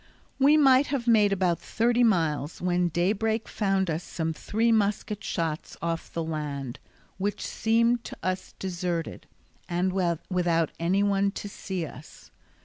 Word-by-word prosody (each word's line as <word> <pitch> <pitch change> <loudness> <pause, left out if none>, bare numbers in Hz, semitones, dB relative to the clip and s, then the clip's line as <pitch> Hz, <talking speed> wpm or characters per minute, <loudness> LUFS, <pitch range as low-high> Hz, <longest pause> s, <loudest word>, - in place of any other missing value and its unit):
We 285 +3 +6
might 270 -2 +5
have 270 -4 -2
made 215 -3 +5
about 180 -3 +1
thirty 240 +2 +1
miles 160 - +1
when 180 0 +1
daybreak 215 +6 0
found 195 -2 0
us 165 +1 -2
some 160 -1 -3
three 225 +8 0
musket 210 -1 0
shots 165 -3 -3
off 165 -1 -3
the 165 - -2
land, 145 -5 -4 0.4
which 205 +2 -2
seemed 230 +1 +2
to - - -8
us 185 0 -3
deserted, 175 -3 -3 0.4
and 180 +2 0
without 175 -2 0
anyone 195 +3 +2
to 205 - -6
see 190 -3 -4
us. 145 0 -13
185 Hz, 140 wpm, -27 LUFS, 170-215 Hz, 0.4 s, We